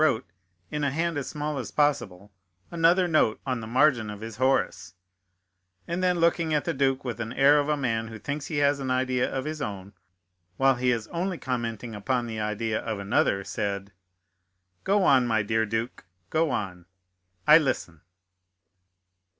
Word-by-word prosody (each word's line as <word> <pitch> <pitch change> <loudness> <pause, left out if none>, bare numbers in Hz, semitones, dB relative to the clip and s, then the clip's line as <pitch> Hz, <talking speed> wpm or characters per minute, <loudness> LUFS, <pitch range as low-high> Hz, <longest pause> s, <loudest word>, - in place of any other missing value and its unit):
wrote, 135 -10 +2 0.5
in 150 0 -2
a 140 - +2
hand 165 +4 -1
as 140 -3 -3
small 150 -1 -3
as 125 - -5
possible, 105 -10 0 0.4
another 170 +2 +3
note 155 -9 +2
on 130 -4 -2
the 110 - -7
margin 125 -2 +3
of 105 -1 -7
his 110 -1 -7
Horace, 125 -9 0 0.9
and 170 +2 -2
then 180 -1 +2
looking 165 -1 +2
at 150 - 0
the - - 0
duke 135 -1 0
with 120 - -3
the 115 -1 -4
air 145 +2 +6
of 145 +1 -1
a 150 - +1
man 115 -5 -1
who 110 0 -8
thinks 140 +5 -5
he 155 - -3
has 145 0 +3
an 135 -1 -3
idea 130 -1 +1
of 135 0 -3
his 155 0 -4
own, 100 -2 -5 0.6
while 135 0 +4
he 125 +1 +1
is 115 -3 0
only 180 +1 -2
commenting 120 -4 -4
upon 120 +4 -1
the 110 -2 -5
idea 110 +1 -1
of 110 -2 -4
another, 100 0 +1
said: 100 0 -3 0.9
"Go 200 0 +2
on, 130 -7 +4
my 110 -3 +1
dear 110 +1 0
duke, 115 +3 -3 0.3
go 160 0 +2
on—I 90 - 0
listen." 90 - -3
125 Hz, 175 wpm, -26 LUFS, 110-150 Hz, 0.9 s, air